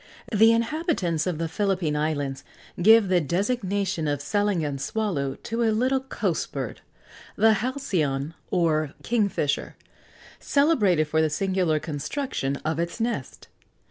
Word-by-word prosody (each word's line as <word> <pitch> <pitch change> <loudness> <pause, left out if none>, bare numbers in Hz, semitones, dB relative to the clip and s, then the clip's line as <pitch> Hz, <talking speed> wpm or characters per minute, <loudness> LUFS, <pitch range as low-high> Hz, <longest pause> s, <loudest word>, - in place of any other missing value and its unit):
The 220 +2 +6
inhabitants 230 - 0
of 175 -4 -1
the 165 +1 -2
Philippine 180 -3 0
Islands 145 -3 -2 0.4
give 220 +2 +7
the 180 -1 +3
designation 190 - -1
of 145 -1 0
salangan 170 -5 0
swallow 145 -8 -2
to 230 +1 -2
a 230 - +3
little 255 +5 +2
coast 265 0 -2
bird - - -5 0.5
(the 220 +1 +5
halcyon, 165 - -1 0.2
or 155 -5 +1
kingfisher), 200 -11 0 0.6
celebrated 220 - +3
for 160 +1 +1
the 160 - +2
singular 185 -2 0
construction 150 - -3
of 160 +1 -1
its 170 +5 -3
nest. 230 - -3
185 Hz, 125 wpm, -25 LUFS, 155-225 Hz, 0.6 s, give